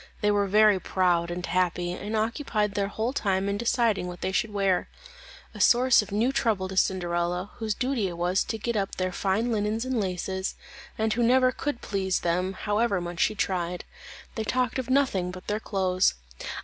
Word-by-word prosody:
They 210 Hz, -1 st, +3 dB
were 205 Hz, -1 st, +2 dB
very 210 Hz, 0 st, +5 dB
proud 175 Hz, -2 st, +1 dB
and 175 Hz, +1 st, -4 dB
happy, 175 Hz, 0 st, 0 dB
and 205 Hz, +4 st, -4 dB
occupied 215 Hz, -2 st, -1 dB
their 200 Hz, -1 st, 0 dB
whole 220 Hz, +5 st, -2 dB
time 195 Hz, -6 st, 0 dB
in 200 Hz, -, 0 dB
deciding 230 Hz, -5 st, +1 dB
what 180 Hz, -1 st, -8 dB
they 190 Hz, -, -1 dB
should 215 Hz, +3 st, 0 dB
wear; 195 Hz, -3 st, +1 dB, 0.6 s
a -, -, -10 dB
source 245 Hz, 0 st, +5 dB
of 210 Hz, -, -9 dB
new 225 Hz, +6 st, +2 dB
trouble 215 Hz, -8 st, 0 dB
to 190 Hz, -, -6 dB
Cinderella, 180 Hz, 0 st, 0 dB
whose 220 Hz, -2 st, -2 dB
duty 250 Hz, -5 st, 0 dB
it 175 Hz, -2 st, -6 dB
was 180 Hz, +2 st, +1 dB
to 225 Hz, -, -3 dB
get 235 Hz, +2 st, -3 dB
up 195 Hz, -2 st, -1 dB
their 185 Hz, 0 st, -1 dB
fine 200 Hz, +6 st, 0 dB
linen 210 Hz, -1 st, 0 dB
and 260 Hz, -2 st, -1 dB
laces, 190 Hz, 0 st, -3 dB, 0.4 s
and 220 Hz, 0 st, +1 dB
who 240 Hz, -, -1 dB
never 255 Hz, +2 st, +4 dB
could 280 Hz, -2 st, -4 dB
please 190 Hz, -2 st, -1 dB
them 180 Hz, +2 st, 0 dB
however 210 Hz, 0 st, 0 dB
much 175 Hz, -1 st, -6 dB
she 215 Hz, -, +2 dB
tried. 180 Hz, -3 st, -2 dB, 0.5 s
They 220 Hz, -, -3 dB
talked 255 Hz, +3 st, 0 dB
of 255 Hz, -1 st, -4 dB
nothing 255 Hz, -10 st, +2 dB
but 180 Hz, +1 st, -9 dB
their 210 Hz, +1 st, -1 dB
clothes. 190 Hz, -3 st, +1 dB
200 Hz, 190 wpm, -27 LUFS, 185-225 Hz, 0.6 s, very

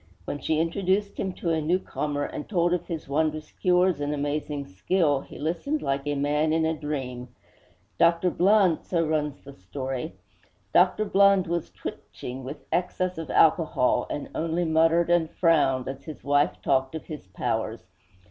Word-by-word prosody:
When 145 Hz, -, -4 dB
she 155 Hz, +3 st, 0 dB
introduced 190 Hz, +4 st, 0 dB
him 190 Hz, -, -1 dB
to 170 Hz, -, -2 dB
a 160 Hz, -1 st, +1 dB
newcomer, 150 Hz, -3 st, -1 dB
and 145 Hz, -, -6 dB
told 175 Hz, -4 st, +2 dB
of 175 Hz, -1 st, -2 dB
his 165 Hz, -5 st, -5 dB
wondrous 155 Hz, +2 st, -1 dB
cures 180 Hz, -3 st, +2 dB
and 145 Hz, +1 st, -1 dB
amazing 145 Hz, 0 st, -2 dB
skill, 145 Hz, -, +1 dB
he -, -, -12 dB
listened 175 Hz, -, -2 dB
like 135 Hz, +1 st, -1 dB
a 145 Hz, -, 0 dB
man 150 Hz, +2 st, +1 dB
in 160 Hz, 0 st, +2 dB
a 160 Hz, -, +1 dB
dream. 135 Hz, -5 st, -4 dB, 0.7 s
'Dr. 170 Hz, +1 st, +4 dB
Blund,' 190 Hz, -2 st, +3 dB
so 170 Hz, -2 st, 0 dB
runs 150 Hz, -2 st, -2 dB
the 140 Hz, -, -11 dB
story 130 Hz, -, -5 dB, 0.6 s
'Dr. 215 Hz, -, +4 dB
Blund 200 Hz, -2 st, +4 dB
was 170 Hz, -1 st, -2 dB
twitching 130 Hz, +2 st, -8 dB
with 135 Hz, +4 st, -8 dB
excess 180 Hz, 0 st, -1 dB
of 160 Hz, -4 st, -6 dB
alcohol, 155 Hz, -7 st, +3 dB
and 145 Hz, -, -4 dB
only 165 Hz, +2 st, -1 dB
muttered 165 Hz, +2 st, +3 dB
and 170 Hz, -2 st, +3 dB
frowned 150 Hz, -7 st, +2 dB
as 135 Hz, +1 st, -6 dB
his 155 Hz, -, -9 dB
wife 145 Hz, +1 st, +2 dB
talked 135 Hz, +1 st, +1 dB
of 160 Hz, -, -6 dB
his 150 Hz, -10 st, -8 dB
powers. 95 Hz, -, -3 dB
160 Hz, 165 wpm, -26 LUFS, 145-175 Hz, 0.7 s, Dr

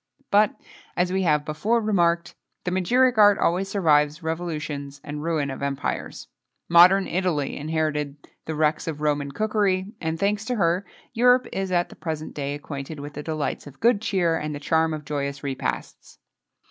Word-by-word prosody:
But, 210 Hz, 0 st, +3 dB, 0.4 s
as 180 Hz, +1 st, +1 dB
we 190 Hz, -, +1 dB
have 150 Hz, -4 st, +2 dB
before 200 Hz, +10 st, 0 dB
remarked, 175 Hz, -6 st, +1 dB, 0.3 s
the 180 Hz, -, -2 dB
magiric 235 Hz, +7 st, +3 dB
art 205 Hz, -1 st, +7 dB
always 185 Hz, +3 st, +1 dB
survives 155 Hz, -6 st, +2 dB
revolutions 155 Hz, -4 st, -4 dB
and 150 Hz, 0 st, -6 dB
ruin 155 Hz, -3 st, -1 dB
of 135 Hz, -, -7 dB
empires. 140 Hz, -1 st, -3 dB, 0.4 s
Modern 180 Hz, +3 st, +7 dB
Italy 170 Hz, -6 st, -1 dB
inherited 150 Hz, -1 st, -2 dB, 0.3 s
the 160 Hz, -, -4 dB
wrecks 155 Hz, +1 st, +1 dB
of 150 Hz, -2 st, -4 dB
Roman 145 Hz, -2 st, 0 dB
cookery, 205 Hz, +1 st, 0 dB
and, 160 Hz, 0 st, -2 dB
thanks 205 Hz, +2 st, 0 dB
to 250 Hz, -, -1 dB
her, 180 Hz, -2 st, +1 dB, 0.3 s
Europe 250 Hz, +2 st, +4 dB
is 195 Hz, -1 st, -2 dB
at 175 Hz, -1 st, +1 dB
the -, -, -13 dB
present 155 Hz, -2 st, -5 dB
day 145 Hz, 0 st, -3 dB
acquainted 145 Hz, +1 st, -7 dB
with 145 Hz, +1 st, -7 dB
the 150 Hz, -, -6 dB
delights 155 Hz, -1 st, -3 dB
of 140 Hz, -1 st, -13 dB
good 230 Hz, -2 st, +3 dB
cheer, 185 Hz, -6 st, +1 dB
and 150 Hz, -1 st, -4 dB
the -, -, -6 dB
charm 160 Hz, +2 st, +1 dB
of 150 Hz, -1 st, -9 dB
joyous 140 Hz, -1 st, -3 dB
repasts. 130 Hz, -, -4 dB
160 Hz, 170 wpm, -24 LUFS, 150-190 Hz, 0.4 s, art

